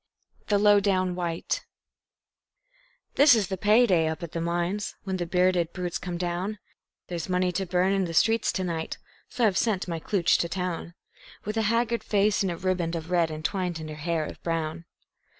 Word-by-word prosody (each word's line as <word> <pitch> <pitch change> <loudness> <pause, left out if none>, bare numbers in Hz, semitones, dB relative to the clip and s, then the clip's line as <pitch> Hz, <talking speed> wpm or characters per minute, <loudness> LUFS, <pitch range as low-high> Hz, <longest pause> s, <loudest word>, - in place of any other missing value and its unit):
The 205 - +3
Low 205 0 +6
Down 185 -2 +1
White 170 -2 -2 1.5
This 285 -3 +8
is 210 -5 0
the 190 - -1
pay 215 +6 +4
day 170 -7 +3
up 160 +2 -4
at 165 - -6
the 165 - -3
mines, 175 +4 -2
when 190 -1 -2
the 175 -1 -3
bearded 180 -1 +2
brutes 180 -2 -3
come 175 -1 -4
down; 180 +4 -2 0.5
There's 175 0 -5
money 180 0 +1
to 190 +2 -2
burn 180 +2 +2
in 195 -1 +1
the 165 - -5
streets 225 +5 +3
to 190 - -1
night, 165 -3 -3 0.3
so 245 -2 +1
I've 195 -4 +2
sent 205 -6 0
my 165 -2 -3
klooch 180 +1 +2
to 170 - -1
town, 175 -2 -4 0.5
With 210 +2 -3
a 225 - +1
haggard 230 -1 +1
face 205 0 +2
and 190 -2 0
a 170 - -5
ribband 175 -2 -1
of 165 +1 -6
red 170 -2 +3
entwined 170 +2 -2
in 155 0 -7
her - - -6
hair 155 +1 -2
of - - -9
brown. 165 0 -3
180 Hz, 195 wpm, -26 LUFS, 170-200 Hz, 1.5 s, This